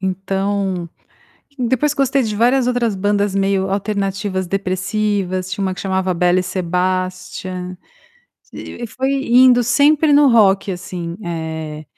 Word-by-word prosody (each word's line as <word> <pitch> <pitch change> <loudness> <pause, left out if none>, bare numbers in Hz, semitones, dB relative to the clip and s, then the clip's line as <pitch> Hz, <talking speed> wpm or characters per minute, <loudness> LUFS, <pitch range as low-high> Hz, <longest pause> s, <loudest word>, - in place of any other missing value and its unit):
então 190 -1 -2 0.7
depois 260 +4 +1
gostei 275 -1 +1
de 215 -3 -2
várias 245 +4 +2
outras 245 -3 0
bandas 205 0 0
meio 195 -1 0
alternativas 195 -1 -2
depressivas, 190 0 -2
tinha 195 +2 -3
uma 190 -1 -1
que - - -8
chamava 190 -1 -1
Belle 180 +1 +2
Sebastian, 185 0 -3 0.8
e 240 - -7
foi 260 +4 -2 0.2
indo 245 0 +6
sempre 290 +5 +3
no 285 -1 +6
rock, 200 -4 +3
assim, 175 -1 -6
eh, 160 -2 -5
195 Hz, 120 wpm, -18 LUFS, 185-230 Hz, 0.8 s, indo